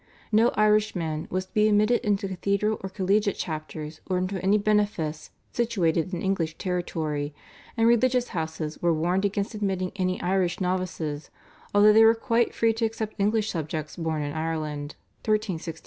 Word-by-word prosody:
No 225 +3 +5
Irishman 210 -7 +1
was 185 +1 -2
to 185 - -34
be 215 -1 +4
admitted 215 +3 +3
into 205 -2 0
cathedral 200 +3 0
or 190 - -5
collegiate 200 +2 +1
chapters 155 -1 -6
or 185 - 0
into 185 +1 -2
any 200 +2 +4
benefice 205 -8 0 0.2
situated 185 -8 0
in 175 -2 -4
English 170 -5 -1
territory, 155 -5 -2 0.4
and 225 0 +4
religious 245 +1 +3
houses 160 -2 -4
were 170 -1 +3
warned 175 +5 +1
against 200 +2 -1
admitting 190 -3 -1
any 185 -1 0
Irish 180 -1 0
novices, 180 -5 -2 0.5
although 210 +1 +7
they 220 +1 +7
were 225 +1 +6
quite 230 0 +1
free 225 0 +3
to 225 +1 0
accept 220 -1 -3
English 215 +1 +1
subjects 155 -2 -4
born 160 -3 -2
in 145 0 -4
Ireland 155 -2 -3 0.3
(1367). 185 -7 -1
185 Hz, 160 wpm, -26 LUFS, 160-215 Hz, 0.5 s, although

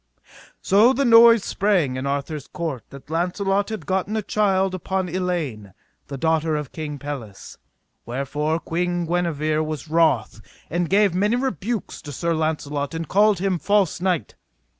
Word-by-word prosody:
So 215 +7 +5
the 275 +1 0
noise 230 -2 +7
sprang 180 -10 +1
in 130 +1 -3
Arthur's 140 +1 -3
court 160 -8 -4
that 140 +2 -13
Launcelot 195 +4 0
had 220 -1 -5
gotten 190 +3 -1
a 215 - -2
child 195 -2 +1
upon 190 0 -2
Elaine, 160 - -3 0.3
the 140 - -6
daughter 160 +1 +1
of 150 -3 -4
King 150 -2 -5
Pelles, 130 -8 -8 0.4
wherefore 145 +6 -2
Queen 175 +1 -2
Guenever 155 -3 0
was 155 -1 -5
wroth, 155 -10 +1 0.3
and 175 +1 -1
gave 200 -1 +3
many 205 +5 +1
rebukes 235 - -3
to 145 - -8
Sir 170 +4 -1
Launcelot, 155 -2 -2
and 165 -1 -4
called 210 +1 +4
him 185 -1 -1
false 200 -4 +1
knight. 180 - -1
170 Hz, 150 wpm, -22 LUFS, 150-195 Hz, 0.4 s, noise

